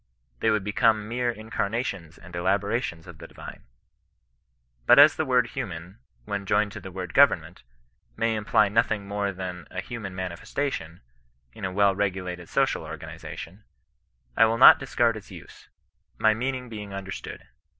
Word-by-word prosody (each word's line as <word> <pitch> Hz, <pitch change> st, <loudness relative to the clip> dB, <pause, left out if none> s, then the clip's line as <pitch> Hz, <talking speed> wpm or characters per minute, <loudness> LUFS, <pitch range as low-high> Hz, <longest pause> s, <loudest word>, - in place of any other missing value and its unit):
They -, -, +2 dB
would 105 Hz, -2 st, +1 dB
become 105 Hz, +1 st, +2 dB
mere 120 Hz, +2 st, -1 dB
incarnations 110 Hz, -6 st, -3 dB
and 85 Hz, +1 st, -12 dB
elaborations 95 Hz, -1 st, -1 dB
of 80 Hz, -3 st, -12 dB
the -, -, -10 dB
divine. -, -, -11 dB, 1.2 s
But -, -, +8 dB
as 145 Hz, +2 st, +8 dB
the 160 Hz, -, -2 dB
word 125 Hz, -2 st, +3 dB
human, 95 Hz, +2 st, -6 dB, 0.3 s
when 100 Hz, -2 st, -4 dB
joined 105 Hz, +1 st, +2 dB
to -, -, -8 dB
the 95 Hz, -, -9 dB
word 90 Hz, -1 st, -6 dB
government, 90 Hz, -, +3 dB, 0.6 s
may 115 Hz, 0 st, +1 dB
imply 105 Hz, -1 st, +2 dB
nothing 105 Hz, -1 st, 0 dB
more 100 Hz, 0 st, -1 dB
than 90 Hz, -2 st, -7 dB
a 90 Hz, -, -5 dB
hum/in 100 Hz, -2 st, -6 dB
manifestation, 90 Hz, -, -4 dB, 0.5 s
in -, -, -6 dB
a 95 Hz, -, -2 dB
well 100 Hz, +1 st, +3 dB
regulated 90 Hz, -3 st, -3 dB
social -, -, +1 dB
organization, 95 Hz, +6 st, -9 dB, 0.7 s
I 115 Hz, -, +6 dB
will 115 Hz, +1 st, +1 dB
not 130 Hz, -, +9 dB
discard 120 Hz, -4 st, +1 dB
its 105 Hz, -, -12 dB
use, -, -, -13 dB, 0.5 s
my 110 Hz, 0 st, +4 dB
mean 130 Hz, +4 st, -2 dB
ing 125 Hz, -1 st, -7 dB
being 105 Hz, -3 st, -7 dB
understood. 100 Hz, 0 st, -7 dB
100 Hz, 155 wpm, -26 LUFS, 95-115 Hz, 1.2 s, not